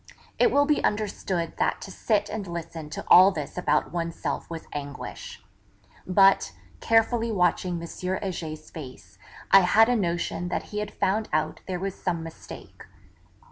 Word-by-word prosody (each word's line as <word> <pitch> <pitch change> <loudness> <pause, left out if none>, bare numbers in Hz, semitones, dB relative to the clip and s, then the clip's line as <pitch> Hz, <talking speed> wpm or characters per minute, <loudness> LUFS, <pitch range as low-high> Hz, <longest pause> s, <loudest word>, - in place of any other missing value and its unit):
It 475 - +5
will 285 0 +4
be 300 0 +1
understood 195 -5 -2
that - - 0
to 195 - -8
sit 210 +1 0
and 205 -2 -5
listen 165 -2 -6
to 150 - -6
all 185 +2 +9
this 155 -7 -5
about 150 -4 0
oneself 170 -1 -3
was 165 -1 -7
anguish. 145 0 -7 0.6
But, 195 - +4 0.3
carefully 225 +1 +2
watching 180 -2 +1
M. 170 - -7
Heger's 175 -4 -5
face, 125 - -11 0.3
I 195 - +10
had 215 +5 +5
a 245 - +3
notion 175 -3 -1
that 175 - -2
he 210 - -1
had 210 0 -3
found 215 +3 -1
out 155 0 -1
there 185 -1 -2
was 195 +1 -3
some 170 -4 -3
mistake. 165 0 -11
180 Hz, 155 wpm, -26 LUFS, 165-205 Hz, 0.6 s, I